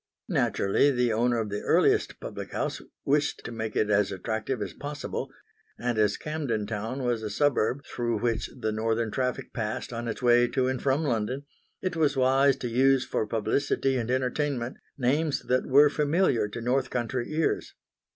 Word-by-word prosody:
Naturally 100 Hz, +8 st, +2 dB
the 125 Hz, -4 st, +1 dB
owner 120 Hz, +2 st, +2 dB
of 110 Hz, -2 st, -2 dB
the 105 Hz, -, -2 dB
earliest -, -, +2 dB
public -, -, -7 dB
house -, -, -2 dB, 0.2 s
wished 145 Hz, +1 st, +1 dB
to -, -, -5 dB
make 110 Hz, -2 st, -4 dB
it 105 Hz, 0 st, +1 dB
as 100 Hz, -1 st, +3 dB
attractive 110 Hz, +6 st, -3 dB
as 100 Hz, -5 st, -4 dB
possible; 145 Hz, 0 st, -5 dB, 0.5 s
and 120 Hz, -2 st, -1 dB
as 105 Hz, -1 st, +3 dB
Camden 140 Hz, -9 st, -2 dB
Town 115 Hz, +5 st, -4 dB
was 120 Hz, -2 st, 0 dB
a 110 Hz, -, -3 dB
suburb 140 Hz, +2 st, +1 dB
through 120 Hz, -2 st, -2 dB
which 115 Hz, -1 st, -1 dB
the 110 Hz, -2 st, -1 dB
northern 110 Hz, +1 st, 0 dB
traffic 125 Hz, +1 st, -2 dB
passed 110 Hz, +1 st, -3 dB
on 120 Hz, 0 st, -4 dB
its 115 Hz, -, -4 dB
way 120 Hz, 0 st, +5 dB
to 130 Hz, +1 st, 0 dB
and 130 Hz, -1 st, -1 dB
from 140 Hz, +3 st, +1 dB
London, 125 Hz, 0 st, -1 dB, 0.4 s
it 185 Hz, -2 st, -1 dB
was 150 Hz, -3 st, +2 dB
wise 135 Hz, +1 st, +4 dB
to 125 Hz, -, -4 dB
use 130 Hz, +2 st, +3 dB
for 110 Hz, -, -1 dB
publicity 115 Hz, +5 st, 0 dB
and 120 Hz, -2 st, -2 dB
entertainment 130 Hz, 0 st, -1 dB, 0.2 s
names 145 Hz, +4 st, +1 dB
that 125 Hz, 0 st, 0 dB
were 145 Hz, +3 st, +7 dB
familiar 150 Hz, -, +2 dB
to 110 Hz, +3 st, -7 dB
north 130 Hz, +2 st, +1 dB
country 120 Hz, +1 st, -2 dB
ears. 160 Hz, +1 st, -1 dB
125 Hz, 175 wpm, -27 LUFS, 110-135 Hz, 0.5 s, were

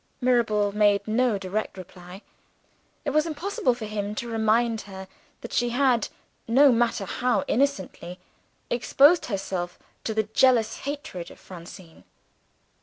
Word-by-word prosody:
Mirabel 230 Hz, -5 st, +2 dB
made 205 Hz, -1 st, +2 dB
no 230 Hz, 0 st, +2 dB
direct 195 Hz, +1 st, -4 dB
reply. 180 Hz, +1 st, -11 dB, 0.8 s
It 285 Hz, -, 0 dB
was 305 Hz, +3 st, +2 dB
impossible 315 Hz, -5 st, -1 dB
for 225 Hz, -, -6 dB
him 210 Hz, -1 st, -4 dB
to 235 Hz, -, -4 dB
remind 225 Hz, 0 st, +1 dB
her 190 Hz, 0 st, -8 dB, 0.3 s
that 235 Hz, -, -8 dB
she 240 Hz, 0 st, +1 dB
had, 245 Hz, -2 st, +2 dB, 0.4 s
no 270 Hz, +4 st, +6 dB
matter 230 Hz, -4 st, +1 dB
how 245 Hz, +6 st, 0 dB
innocently, 195 Hz, -9 st, -1 dB, 0.5 s
exposed 280 Hz, +7 st, +4 dB
herself 190 Hz, -4 st, -3 dB, 0.3 s
to 220 Hz, -, -2 dB
the 220 Hz, -, +2 dB
jealous 225 Hz, +1 st, +3 dB
hatred 280 Hz, -12 st, -6 dB
of -, -, -15 dB
Francine. 175 Hz, -1 st, -12 dB
220 Hz, 130 wpm, -25 LUFS, 195-250 Hz, 0.8 s, no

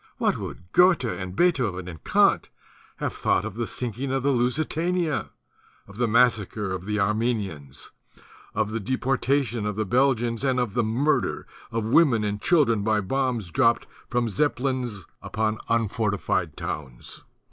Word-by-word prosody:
What -, -, +2 dB
would 90 Hz, 0 st, -8 dB
Goethe 180 Hz, -5 st, +5 dB
and 95 Hz, -6 st, -4 dB
Beethoven 115 Hz, -, +1 dB
and 80 Hz, -4 st, -9 dB
Kant -, -, +3 dB, 0.5 s
have -, -, -3 dB
thought -, -, +1 dB
of 110 Hz, -, -5 dB
the 115 Hz, +1 st, -3 dB
sinking 125 Hz, +2 st, -3 dB
of 135 Hz, -1 st, 0 dB
the 140 Hz, -, +3 dB
"Lusitania," 155 Hz, +6 st, 0 dB, 0.6 s
of 100 Hz, -, -13 dB
the 120 Hz, 0 st, +1 dB
massacre 110 Hz, -3 st, +2 dB
of 90 Hz, 0 st, -5 dB
the 105 Hz, +1 st, -1 dB
Armenians, 100 Hz, -, -2 dB, 0.6 s
of 110 Hz, -1 st, 0 dB
the 115 Hz, -, -2 dB
deportation 130 Hz, 0 st, 0 dB
of 105 Hz, -, -2 dB
the 110 Hz, +1 st, -1 dB
Belgians 120 Hz, 0 st, +1 dB
and 130 Hz, -2 st, +2 dB
of 120 Hz, -5 st, -1 dB
the 120 Hz, -, +1 dB
murder 125 Hz, +8 st, 0 dB, 0.3 s
of 115 Hz, -1 st, -1 dB
women 130 Hz, -10 st, +5 dB
and 105 Hz, 0 st, -2 dB
children 135 Hz, -11 st, +3 dB
by 110 Hz, +1 st, +2 dB
bombs 120 Hz, -3 st, -1 dB
dropt 115 Hz, +1 st, +3 dB, 0.2 s
from 120 Hz, -1 st, +1 dB
Zeppelins 125 Hz, -, -1 dB, 0.2 s
upon 110 Hz, 0 st, -1 dB
unfortified 105 Hz, -7 st, 0 dB
towns? 65 Hz, -5 st, -6 dB
115 Hz, 145 wpm, -25 LUFS, 105-130 Hz, 0.6 s, Goethe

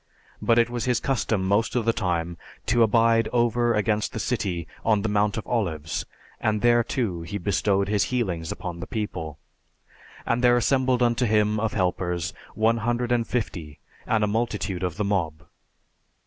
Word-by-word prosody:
But 115 Hz, -, +3 dB
it 115 Hz, -1 st, +5 dB
was 120 Hz, -2 st, -2 dB
his 125 Hz, -1 st, +2 dB
custom 115 Hz, -7 st, 0 dB
most 105 Hz, +5 st, +1 dB
of 120 Hz, -3 st, +1 dB
the 115 Hz, -, +3 dB
time 85 Hz, -6 st, -1 dB, 0.3 s
to 120 Hz, +1 st, +2 dB
abide 115 Hz, 0 st, +4 dB
over 120 Hz, 0 st, +2 dB
against 105 Hz, -1 st, 0 dB
the -, -, -3 dB
city 95 Hz, -9 st, -2 dB, 0.2 s
on 105 Hz, -3 st, +2 dB
the 110 Hz, -, 0 dB
Mount 105 Hz, +2 st, +1 dB
of 110 Hz, -, -4 dB
Olives, 80 Hz, -10 st, -2 dB, 0.3 s
and 105 Hz, -1 st, 0 dB
there, 120 Hz, 0 st, +5 dB
too, 110 Hz, -10 st, -2 dB
he 85 Hz, +5 st, -5 dB
bestowed 100 Hz, 0 st, +1 dB
his 105 Hz, -1 st, +2 dB
healings 90 Hz, -10 st, -2 dB
upon 85 Hz, -2 st, -6 dB
the 90 Hz, -, -6 dB
people. 85 Hz, -8 st, -4 dB, 0.9 s
And 120 Hz, +1 st, 0 dB
there 120 Hz, 0 st, +5 dB
assembled 130 Hz, 0 st, +2 dB
unto 120 Hz, 0 st, +2 dB
him 105 Hz, 0 st, +2 dB
of 110 Hz, 0 st, -1 dB
helpers 90 Hz, -3 st, -1 dB, 0.2 s
one 110 Hz, +2 st, +2 dB
hundred 120 Hz, +1 st, -1 dB
and 120 Hz, -2 st, +1 dB
fifty, 85 Hz, -10 st, -3 dB, 0.3 s
and 110 Hz, -1 st, +2 dB
a -, -, +2 dB
multitude 105 Hz, -4 st, -2 dB
of 90 Hz, -2 st, -2 dB
the 105 Hz, -, 0 dB
mob. 85 Hz, -6 st, -1 dB
105 Hz, 175 wpm, -25 LUFS, 95-120 Hz, 0.9 s, it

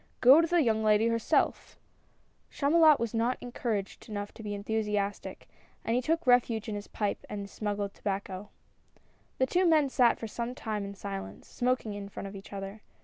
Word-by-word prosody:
Go 265 Hz, +6 st, +8 dB
to 335 Hz, -, +1 dB
the 345 Hz, -1 st, +3 dB
young 220 Hz, -3 st, +1 dB
lady 215 Hz, +1 st, +4 dB
herself! 230 Hz, -1 st, 0 dB, 0.4 s
" -, -, -40 dB
Chamulot 310 Hz, +1 st, +5 dB
was 230 Hz, -1 st, -2 dB
not 235 Hz, +2 st, +1 dB
encouraged 230 Hz, -4 st, -4 dB
enough 205 Hz, -1 st, -5 dB
to -, -, -11 dB
be 205 Hz, -1 st, -4 dB
enthusi 210 Hz, +1 st, -2 dB
astic, 205 Hz, 0 st, -3 dB, 0.4 s
and 225 Hz, -, +1 dB
he 250 Hz, -, +2 dB
took 325 Hz, +5 st, 0 dB
refuge 240 Hz, -3 st, +3 dB
in 215 Hz, -, -3 dB
his 205 Hz, 0 st, -6 dB
pipe 205 Hz, -2 st, -2 dB
and 205 Hz, -, -4 dB
his 200 Hz, 0 st, -8 dB
smuggled 205 Hz, -1 st, -3 dB
tobacco. 195 Hz, 0 st, -4 dB, 0.9 s
The 260 Hz, -, +3 dB
two 355 Hz, +8 st, +1 dB
men 310 Hz, -4 st, +4 dB
sat 250 Hz, -3 st, +4 dB
for 225 Hz, -, -5 dB
some 235 Hz, +3 st, -4 dB
time 215 Hz, -4 st, -3 dB
in 200 Hz, 0 st, -7 dB
silence, 195 Hz, -1 st, -7 dB
smoking 245 Hz, -3 st, -1 dB
in 200 Hz, -1 st, -7 dB
front 200 Hz, -, -7 dB
of 195 Hz, -, -9 dB
each 195 Hz, -, -11 dB
other. 195 Hz, +1 st, -6 dB
220 Hz, 195 wpm, -29 LUFS, 205-250 Hz, 0.9 s, Go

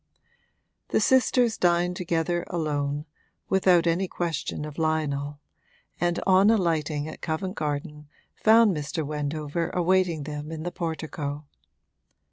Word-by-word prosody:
The -, -, +1 dB
sisters 250 Hz, -3 st, +3 dB
dined 175 Hz, 0 st, +2 dB
together 175 Hz, -1 st, -1 dB
alone, 145 Hz, -3 st, -2 dB, 0.4 s
without 185 Hz, -3 st, +4 dB
any 170 Hz, +3 st, +1 dB
question 165 Hz, -4 st, -3 dB
of 150 Hz, +1 st, -8 dB
Lionel, 145 Hz, -2 st, -1 dB, 0.6 s
and 175 Hz, 0 st, +1 dB
on 190 Hz, +2 st, +5 dB
alighting 160 Hz, -8 st, +1 dB
at 155 Hz, -, -9 dB
Covent 175 Hz, +4 st, -2 dB
Garden 150 Hz, -2 st, -4 dB, 0.3 s
found 220 Hz, -3 st, +5 dB
Mr. 150 Hz, +1 st, -3 dB
Wendover 150 Hz, +2 st, -2 dB
awaiting 180 Hz, -3 st, +1 dB
them 150 Hz, +1 st, -6 dB
in 160 Hz, -1 st, -5 dB
the 175 Hz, -, -3 dB
portico. 155 Hz, -3 st, -4 dB
160 Hz, 115 wpm, -26 LUFS, 150-180 Hz, 0.6 s, on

